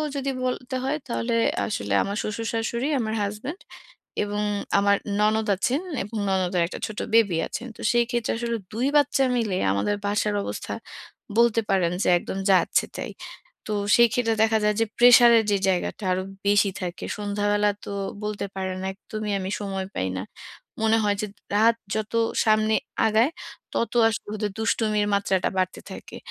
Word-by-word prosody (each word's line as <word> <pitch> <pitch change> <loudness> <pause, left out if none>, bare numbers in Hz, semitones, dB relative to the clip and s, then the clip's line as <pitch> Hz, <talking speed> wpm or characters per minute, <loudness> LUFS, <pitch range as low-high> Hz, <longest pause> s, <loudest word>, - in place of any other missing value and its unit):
যদি 275 0 -2
বলতে 255 0 -2
হয়, 275 +3 0
তাহলে 235 -1 -2 0.3
আসলে 100 - -2
আমার 200 +1 -3
শ্বশুর, 220 +2 -3
শাশুড়ি, 235 +4 -1
আমার 220 -2 -2
হাসব্যান্ড, 215 - -4 0.6
এবং 205 0 -2 0.4
আমার 200 0 +3 0.2
ননদ 215 +1 +2
আছেন 255 - 0 0.2
এবং 220 +3 -6
ননদের 185 -2 +1
একটা - - -7
ছোট 215 - -7
বেবি 205 -7 +4
আছে। - - -5 0.2
তো - - -10
সেই 240 0 +3
ক্ষেত্রে 240 -2 -1
আসলে 235 0 -2 0.2
২ 245 +5 0
বাচ্চা 290 -1 +3
মিলে 215 -5 0 0.2
আমাদের 100 - 0
বাসার 205 0 0
অবস্থা - - -5 0.7
বলতে 235 -1 +4
পারেন, 185 -4 +2
যে - - -1
একদম 190 - -5
যাচ্ছে-তাই। 185 - +1 0.6
তো 215 - -3 0.2
সেই 235 -1 +6
ক্ষেত্রে 230 -2 +1
দেখা 220 0 +3
যায় 210 0 +3
যে 225 - +3
প্রেশার 240 0 +8
এর 220 - +1
যে 200 - +3
জায়গাটা 185 +2 -1
আরো 185 - 0 0.2
বেশি 205 0 +4
থাকে। 175 0 -5
সন্ধ্যাবেলা 205 0 +1
তো - - -7 0.3
বলতে 210 -1 -3
পারেন 190 -1 -3
একদমই 210 +1 -5
আমি 190 - -4
সময় 195 -2 -3
পাই 95 - -1
না। 90 - -3 0.6
মনে 225 0 +4
হয় 205 -1 +2
যে - - -1 0.3
রাত 230 +2 +5 0.2
যত 215 0 -3 0.3
সামনে 215 0 +3 0.3
আগায়, 220 +6 +3 0.4
তত 230 - -1 0.2
আসলে 225 - -4
ওদের 210 0 -2
দুষ্টুমির 215 -2 +1
মাত্রাটা 195 -2 +1
বাড়তে 185 0 -1
থাকে। - - -9
215 Hz, 160 wpm, -25 LUFS, 200-230 Hz, 0.7 s, প্রেশার